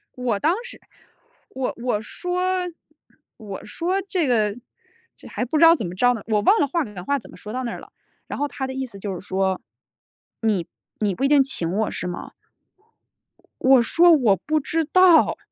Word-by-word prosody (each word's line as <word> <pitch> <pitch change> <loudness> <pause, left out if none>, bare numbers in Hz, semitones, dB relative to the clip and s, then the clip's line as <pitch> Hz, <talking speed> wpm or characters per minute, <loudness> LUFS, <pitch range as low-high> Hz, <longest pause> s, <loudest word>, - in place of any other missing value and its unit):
我 245 -5 -1
当 320 - +2
时， 485 - -11 0.7
我 260 -1 -3
我 245 -4 0
说 360 +10 -4 1.0
我 205 -4 -8
说 360 - -2
这 360 -6 0
个 215 -4 +1 0.6
这 - - -15
还 - - -3
不 280 +6 -1
知 320 - +4
道 330 +1 +8
怎 225 - -4
么 175 - -6
着 245 +6 +3
呢， 225 - -6
我 215 -2 +1
忘 420 - +4
了 285 - +2
话 330 +4 0
赶 210 -7 -9
话 280 +8 0
怎 - - -15
么 - - -13
说 210 - -9
到 255 +1 -3
那 235 - -3
儿 - - -7
了， - - -15 0.4
然 - - -5
后 290 - 0
他 265 -2 -5
的 265 - -5
意 265 0 -3
思 200 -6 -11
就 195 0 -4
是 - - -14
说， 190 -1 0 1.4
你 210 - +1
你 - - -2
不 230 - -2
一 - - +4
定 290 -1 +6
请 180 -11 -3
我 210 +4 0
是 - - -5
吗？ 175 0 -6 1.3
我 260 -1 +6
说 340 +9 +5
我 245 -11 +4
不 310 - -1
知 325 +3 -1
道。 365 +1 +5
255 Hz, 215 characters per minute, -23 LUFS, 210-310 Hz, 1.4 s, 道